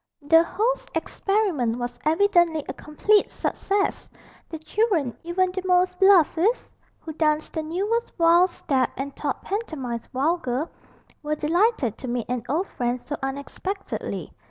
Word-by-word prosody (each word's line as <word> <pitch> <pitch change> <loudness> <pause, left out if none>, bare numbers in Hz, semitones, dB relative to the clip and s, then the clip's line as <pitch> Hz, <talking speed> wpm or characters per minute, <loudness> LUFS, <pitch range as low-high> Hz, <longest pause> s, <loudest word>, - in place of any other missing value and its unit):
The 325 +3 +6
host's 465 +8 -1
experiment 360 - 0
was 245 0 -5
evidently 330 -2 +3
a 260 - -4
complete 400 +10 +1
success: 400 0 -1 0.4
the 325 - -5
children, 315 - 0
even 365 +2 +1
the 375 +1 -3
most 360 0 +2
blasés, 385 +3 +4 0.3
who 320 - -7
danced 305 0 0
the 320 - -1
newest 400 +9 -1
valse 345 +2 +5
step 270 -6 0
and 275 +1 -5
thought 285 -3 -3
pantomines 280 - -4
vulgar, 285 0 -1 0.5
were 300 0 -1
delighted 315 - +1
to 260 - -6
meet 240 -1 -2
an 250 -1 -1
old 340 +8 0
friend 245 0 -2
so 290 +4 -5
unexpectedly. 280 +9 -5
325 Hz, 135 wpm, -24 LUFS, 280-385 Hz, 0.5 s, The